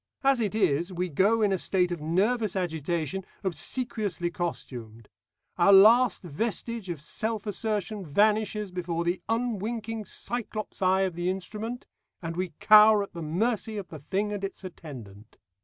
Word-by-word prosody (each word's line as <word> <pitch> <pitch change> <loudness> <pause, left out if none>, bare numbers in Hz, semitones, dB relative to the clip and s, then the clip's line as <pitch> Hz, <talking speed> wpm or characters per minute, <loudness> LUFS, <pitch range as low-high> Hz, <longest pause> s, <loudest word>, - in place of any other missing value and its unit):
As 270 -2 +4
it 215 -2 -1
is, 175 -4 +1
we 180 0 -2
go 205 +8 +3
in 205 - +3
a 190 - +1
state 180 -1 +1
of 170 -3 -4
nervous 200 +6 +1
agitation, 170 0 -2 0.2
obsequiously 200 -2 -2
costumed; 115 -11 -6 0.5
our 175 +3 +6
last 220 +5 +6
vestige 220 +5 -3
of 170 -4 -4
self 215 +8 -3
assertion 210 0 -2
vanishes 210 +4 +1
before 170 -2 -2
the 175 +2 -1
unwinking 225 -1 -2
Cyclops 220 0 -5
eye 190 0 +3
of 190 -2 0
the 175 +2 -2
instrument, 215 +6 -5 0.3
and 165 -1 -5
we 180 -2 -3
cower 215 -1 +7
at 200 - -10
the 170 - -6
mercy 215 +7 -1
of 195 -3 -6
the 155 - -8
thing 195 +8 -2
and 200 -1 -5
its 195 0 -5
attendant. 120 - -10
195 Hz, 155 wpm, -27 LUFS, 170-215 Hz, 0.5 s, cower